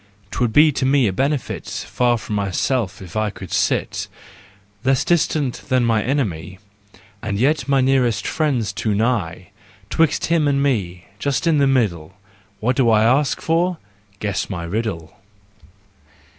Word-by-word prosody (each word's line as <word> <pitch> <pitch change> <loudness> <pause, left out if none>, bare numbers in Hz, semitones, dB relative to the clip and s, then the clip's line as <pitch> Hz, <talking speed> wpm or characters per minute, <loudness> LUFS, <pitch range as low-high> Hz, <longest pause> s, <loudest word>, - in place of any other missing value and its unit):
'Twould 120 -3 0
be 150 +5 +6
to 135 - -3
me 135 0 +3
a 100 - 0
benefit 140 +6 -2
Far 120 -1 0
from 110 - -7
myself 100 +1 -1
if 90 -3 -12
I 110 0 0
could 95 -3 -10
sit, - - 0 0.8
Less 135 +1 +2
distant 155 -6 +1
than 130 -2 +3
my 115 -2 +2
enemy, 100 - -2
JEST, 95 +3 -19
RUSE 100 -1 -35
AND 105 -1 -29
REVENGE 100 0 -27
19 110 - -5
And 100 -1 -2
yet 140 +2 +1
my 135 -1 +3
nearest 125 -5 +2
friend's 130 -10 0
too 105 +2 -1
nigh— 100 -6 -1 0.4
'Twixt 160 -2 +2
him 165 -3 +2
and 140 -1 +1
me, 90 -10 -1
just 140 +6 -1
in 160 -3 +3
the 140 - +4
middle! 95 -11 0 0.4
What 125 +4 0
do 125 -4 +4
I 110 -1 +4
ask 135 +5 +2
for? 170 +2 +1 0.4
Guess 100 -2 -2
my 90 -4 -4
riddle! 85 -3 -4
120 Hz, 170 wpm, -20 LUFS, 100-140 Hz, 0.8 s, be